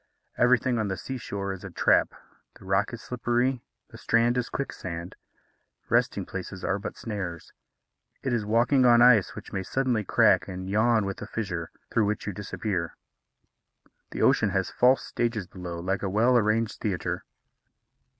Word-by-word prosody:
Everything 125 0 +3
on 110 - 0
the 95 -1 -3
sea 130 +9 -5
shore 100 -3 -4
is 95 - -10
a 95 - -6
trap 85 - +2 0.4
the - - -16
rock 95 +2 +1
is 115 -2 -8
slippery, 125 +1 0 0.3
the - - -12
strand 115 +1 +2
is 125 -2 -1
quicksand. 90 -10 -5 0.7
Resting - - +1
places 95 0 -7
are 95 +1 0
but 100 - -6
snares. 95 -7 -6 0.7
It 130 - -1
is 115 -3 0
walking 120 +5 +3
on 120 -1 +6
ice 115 -6 +5
which - - -10
may 95 - -1
suddenly 125 +1 0
crack 105 -2 +3
and 95 -1 -6
yawn 110 +2 +2
with 100 0 -5
a 105 - -6
fissure, 95 -8 -4 0.2
through 115 - +2
which 105 - -2
you 105 - -3
disappear. 95 -3 -3 1.1
The - - -3
ocean - - +4
has - - -1
false 130 +2 +4
stages 115 -4 -2
below, 90 -2 -7
like 95 +3 -2
a 100 - -2
well 115 +6 +3
arranged 110 -1 +1
theatre. 95 -6 -2
105 Hz, 165 wpm, -27 LUFS, 95-120 Hz, 1.1 s, on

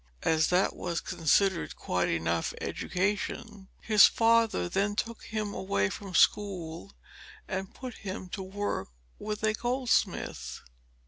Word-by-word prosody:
As 160 -1 +3
that 180 +2 +2
was 170 -1 -2
considered 185 +3 +1
quite 90 0 -1
enough 85 0 0
education, 205 +1 -2
his 215 -3 +7
father 230 - +3
then 200 - 0
took 230 +1 -3
him 215 -2 -3
away 100 - 0
from 195 -3 -7
school 170 - +1 0.5
and 190 0 -4
put 255 -2 -7
him 190 -2 -6
to 195 - -5
work 195 - -3 0.3
with 210 0 -4
a 215 0 +3
goldsmith. 245 +2 -1
195 Hz, 125 wpm, -29 LUFS, 170-215 Hz, 0.5 s, his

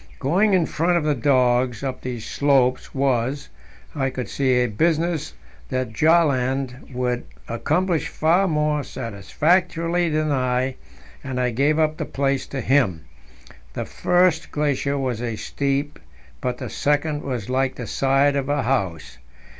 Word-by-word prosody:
Going 190 +9 +2
in 175 -3 +3
front 170 +4 +1
of 170 - 0
the 150 -1 +2
dogs 125 -1 +2
up 130 -2 -3
these 120 -3 -5
slopes 135 -3 +1
was, 135 0 0 0.4
I 135 -3 0
could 125 -1 -5
see, 135 -2 +1
a - - +3
business 160 - 0 0.3
that 130 -3 -2
Bjaaland 135 -3 +1
would 125 -1 -2 0.2
accomplish 170 +8 0
far 175 +5 +2
more 150 -2 0
satisfactorily 165 - 0
than 155 0 0
I, 130 -1 0 0.5
and 130 -2 -3
I 125 -1 +1
gave 140 +6 +2
up 155 -1 +1
the - - -3
place 135 -1 -1
to 135 - -4
him. 110 - +1 0.7
The - - -3
first 180 -1 +2
glacier 140 -1 0
was 125 -4 -2 0.2
steep, 140 +1 -2 0.4
but 125 -1 -2
the - - -6
second 145 +1 0
was 125 -7 -4
like 130 0 0
the 125 - -6
side 135 +4 +2
of 140 -1 -1
a 145 -1 +1
house. 100 - -2
135 Hz, 145 wpm, -22 LUFS, 125-155 Hz, 0.7 s, in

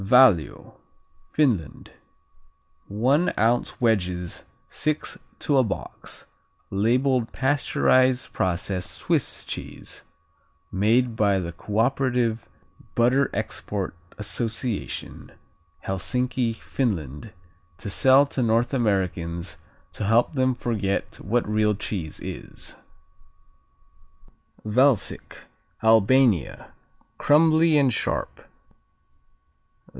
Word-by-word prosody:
Valio 105 - +3 0.5
Finland 115 - 0 1.0
One 130 - +2
ounce 115 +5 +1
wedges, 90 -7 0 0.2
six 155 0 -2 0.2
to 145 - +1
a 130 - +5
box, 110 - -6 0.5
labeled 120 +4 +1
pasteurized 130 -2 +2
process 90 0 -1
Swiss - - -2
cheese, - - -6 0.7
made 115 +5 +2
by 100 -3 +2
the 85 -2 -4
Cooperative 120 +4 0 0.5
Butter 125 +4 +3
Export 100 -3 -4 0.2
Association, 110 +2 -4 0.5
Helsinki, 120 +5 -1
Finland, 100 - -3 0.5
to - - -8
sell 130 +7 +5
to 135 -2 -3
North 115 +2 +1
Americans 95 -7 -1 0.3
to 105 - -4
help 115 +7 +3
them 130 -2 +1
forget 105 -5 -2
what 115 +6 0
real 105 0 +2
cheese 95 -6 -4
is. - - -6 1.9
Valsic 125 +1 +1 0.4
Albania 110 - +3 0.5
Crumbly 160 +1 +4
and 135 -4 +3
sharp. - - -2
115 Hz, 80 wpm, -24 LUFS, 100-130 Hz, 1.9 s, a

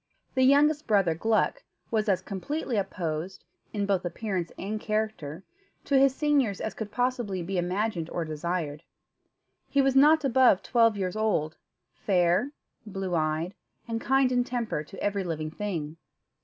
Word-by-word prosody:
The 260 - +1
youngest 290 +3 +4
brother, 195 -7 +3
Gluck, 220 - +1 0.3
was 215 -2 +1
as 185 -2 +1
completely 235 - -3
opposed, 185 -3 -3 0.3
in 205 -2 -1
both 195 -2 +1
appearance 180 -1 -3
and 215 +3 -3
character, 215 -7 -3 0.4
to 280 - 0
his 270 -1 +4
seniors 275 -10 +1
as 220 - -3
could 220 -2 -6
possibly 240 -7 -1
be 185 +1 -2
imagined 180 -1 -1
or 170 - -3
desired. 155 -1 -3 0.9
He 280 - +1
was 270 -1 +3
not 300 +2 +6
above 255 -6 +4
twelve 230 -3 +3
years 185 -1 -2
old, 205 -8 0 0.4
fair, 180 +5 +2 0.3
blue 195 -4 -4
eyed, 160 +2 0 0.3
and 225 -1 -3
kind 270 0 +3
in 245 -1 +2
temper 235 -11 -2
to 195 +4 -9
every 200 -1 0
living 155 -3 -3
thing. 165 -5 -4
205 Hz, 150 wpm, -27 LUFS, 175-245 Hz, 0.9 s, not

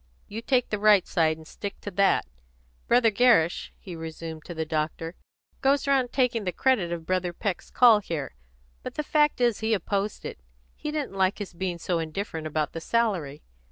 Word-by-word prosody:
You 220 +2 -6
take 250 0 +1
the 210 - -1
right 210 -3 +5
side, 160 -2 +1
and 160 - -13
stick 200 +3 -7
to 205 - -6
that. 195 +1 +3 0.6
Brother 235 -2 +4
Gerrish," 210 -7 +3
he 185 -4 -9
resumed, 160 -1 -7
to 175 - -7
the 160 0 -2
doctor, 155 +2 -2 0.5
"goes 275 +1 +2
round 265 -3 +2
taking 250 -4 +1
the 180 - -1
credit 210 -7 +1
of 170 -1 -4
Brother 185 0 0
Peck's 190 +1 -3
call 235 -4 +6
here; 165 -8 -4 0.5
but - - -7
the 300 - -1
fact 300 -1 +2
is 240 -3 +2
he 220 0 +1
opposed 200 +2 -2
it. - - -6 0.4
He 300 - -5
didn't 300 -7 -3
like 190 0 +1
his 205 -3 -6
being 180 0 -3
so 170 0 -1
indifferent 160 0 -4
about 155 0 -2
the 165 - -5
salary. 185 -11 0
195 Hz, 190 wpm, -26 LUFS, 165-230 Hz, 0.6 s, call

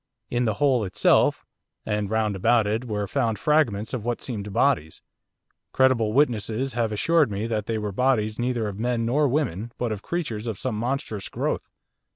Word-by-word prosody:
In 120 0 +1
the 110 -2 0
hole 130 -1 +2
itself, 95 - +2 0.4
and 105 -1 -1
round 110 -2 0
about 115 +3 +3
it, 110 +4 -1
were 105 -3 -2
found 115 -5 0
fragments 120 -7 +1
of 120 -5 -3
what 120 0 -2
seemed 105 -5 -5
bodies; 80 -4 +1 0.7
credible 130 -5 +3
witnesses 120 -1 +1
have 115 -2 0
assured 155 +6 +3
me 100 +1 -3
that 110 -2 -2
they 115 - -1
were 105 -1 -3
bodies 110 -1 +1
neither 120 -2 0
of 100 0 -6
men 120 0 0
nor 145 +5 +2
women, 120 - -1
but 120 -2 -2
of 105 -2 -4
creatures 120 -11 -3
of 110 -4 -3
some - - -3
monstrous 115 -3 -3
growth. - - -2
115 Hz, 180 wpm, -25 LUFS, 105-125 Hz, 0.7 s, about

